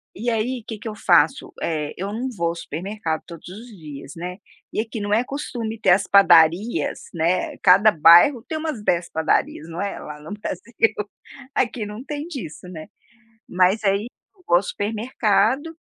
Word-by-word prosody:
E 235 Hz, +5 st, -2 dB
aí, 235 Hz, +2 st, -2 dB
que 220 Hz, -2 st, -6 dB
que 225 Hz, -, -8 dB
eu 215 Hz, -, -5 dB
faço? 170 Hz, -6 st, +2 dB
Eh, 155 Hz, -3 st, -2 dB
eu 195 Hz, +3 st, -4 dB
não 240 Hz, +5 st, -3 dB
vou 170 Hz, -3 st, -1 dB
ao 170 Hz, -, -4 dB
supermercado 170 Hz, 0 st, -4 dB
todos 170 Hz, -2 st, -11 dB
os 215 Hz, +6 st, -10 dB
dias, 150 Hz, -, -10 dB
né, 180 Hz, +2 st, -6 dB, 0.4 s
e -, -, -2 dB
aqui 225 Hz, 0 st, -6 dB
não 205 Hz, 0 st, -2 dB
é 225 Hz, +3 st, +3 dB
costume 240 Hz, -5 st, -5 dB
ter 190 Hz, -, +3 dB
as 190 Hz, +2 st, +3 dB
padarias, 180 Hz, +2 st, +4 dB
né, 170 Hz, +2 st, 0 dB
cada 195 Hz, +4 st, +6 dB
bairro 175 Hz, -, +6 dB
tem 320 Hz, -1 st, -3 dB
umas 310 Hz, -9 st, -4 dB
10 170 Hz, -3 st, +1 dB
padarias, 160 Hz, 0 st, -1 dB
não 165 Hz, +1 st, -7 dB
é 200 Hz, 0 st, -3 dB
lá 150 Hz, 0 st, -9 dB
no 150 Hz, +2 st, -11 dB
Brasil, 210 Hz, +2 st, -2 dB, 0.6 s
aqui 240 Hz, -3 st, -1 dB
não 210 Hz, +4 st, -8 dB
tem 295 Hz, +2 st, -5 dB
disso, 200 Hz, -, -8 dB
né, 160 Hz, -3 st, -9 dB, 0.6 s
mas 185 Hz, +4 st, +2 dB
aí 200 Hz, +2 st, +1 dB, 0.3 s
eu 370 Hz, -, -25 dB
vou 175 Hz, -, +4 dB
ao 175 Hz, -, +3 dB
supermercado, 220 Hz, -, 0 dB
200 Hz, 180 wpm, -22 LUFS, 170-225 Hz, 0.6 s, cada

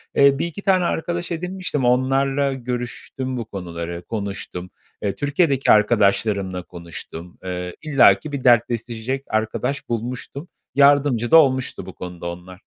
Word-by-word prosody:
eee, 140 Hz, 0 st, +5 dB
1-2 170 Hz, +4 st, -3 dB
tane 185 Hz, -2 st, +3 dB
arkadaş 175 Hz, +1 st, -2 dB
edinmiştim. 180 Hz, -5 st, -2 dB
Onlarla 135 Hz, +2 st, +2 dB
görüştüm 125 Hz, +1 st, -5 dB
bu 115 Hz, -, -4 dB
konuları, 85 Hz, -3 st, -6 dB
konuştum. 100 Hz, -4 st, -5 dB, 0.3 s
Eee, 100 Hz, -, 0 dB
Türkiye'deki 145 Hz, -1 st, +2 dB
arkadaşlarımla 100 Hz, -3 st, +2 dB
konuştum. 85 Hz, 0 st, -9 dB
Eee, 90 Hz, -1 st, -4 dB
illaki 140 Hz, -3 st, +4 dB
bir 140 Hz, -3 st, -4 dB
dertleşecek 120 Hz, +2 st, +1 dB
arkadaş 110 Hz, +6 st, -2 dB
bulmuştum. 125 Hz, +6 st, -4 dB, 0.3 s
Yardımcı 140 Hz, -4 st, +4 dB
da 165 Hz, -, +9 dB
olmuştu 130 Hz, -4 st, +2 dB
bu -, -, -9 dB
konuda 90 Hz, -1 st, -8 dB
onlar. 90 Hz, +3 st, -10 dB
120 Hz, 125 wpm, -22 LUFS, 100-140 Hz, 0.3 s, da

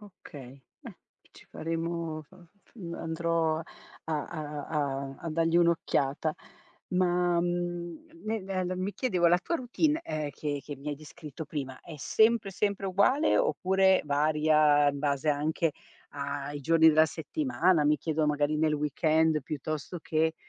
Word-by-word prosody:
Okay, 140 Hz, -10 st, -13 dB, 0.2 s
beh, -, -, -11 dB, 0.3 s
ci -, -, -17 dB
faremo 165 Hz, -1 st, -3 dB
f -, -, -27 dB
f 185 Hz, +1 st, -21 dB
f 180 Hz, -7 st, -8 dB
andrò 165 Hz, -1 st, 0 dB
a -, -, -5 dB, 0.6 s
a 150 Hz, -3 st, -6 dB
a 140 Hz, -3 st, -2 dB
a 165 Hz, -, -5 dB
dargli 165 Hz, +1 st, +1 dB
un'occhiata, 155 Hz, -3 st, +1 dB, 0.6 s
ma, 180 Hz, -1 st, +2 dB
mhmm, 175 Hz, -1 st, -3 dB, 0.2 s
ne 220 Hz, 0 st, -1 dB
nel 185 Hz, -1 st, -2 dB
mi 190 Hz, +2 st, -2 dB
chiedevo 185 Hz, -10 st, +1 dB
la 175 Hz, +1 st, +4 dB
tua 335 Hz, -, -1 dB
routine, 300 Hz, +4 st, 0 dB
uhm, 155 Hz, -1 st, -3 dB
che 145 Hz, 0 st, -4 dB
che 145 Hz, -, -7 dB
mi 140 Hz, +3 st, -7 dB
hai 145 Hz, -, -3 dB
descritto 155 Hz, 0 st, -9 dB
prima, 135 Hz, -3 st, -5 dB
è 165 Hz, -, -10 dB
sempre, 220 Hz, +5 st, +2 dB
sempre 200 Hz, 0 st, -1 dB
uguale, 200 Hz, -, +3 dB
oppure 190 Hz, -, +3 dB
varia 150 Hz, 0 st, +3 dB
in 140 Hz, 0 st, -2 dB
base 140 Hz, 0 st, -1 dB
anche 150 Hz, +2 st, +1 dB, 0.4 s
a 140 Hz, 0 st, -4 dB
i 145 Hz, -, -5 dB
giorni 160 Hz, +2 st, +5 dB
della 155 Hz, 0 st, +5 dB
settimana, 175 Hz, -, +1 dB
mi 150 Hz, +1 st, +4 dB
chiedo, 155 Hz, 0 st, 0 dB
magari 150 Hz, 0 st, +1 dB
nel 155 Hz, 0 st, +2 dB
weekend 155 Hz, +2 st, +2 dB
piuttosto 155 Hz, +4 st, -5 dB
che 160 Hz, +1 st, 0 dB
160 Hz, 150 wpm, -29 LUFS, 150-180 Hz, 0.6 s, giorni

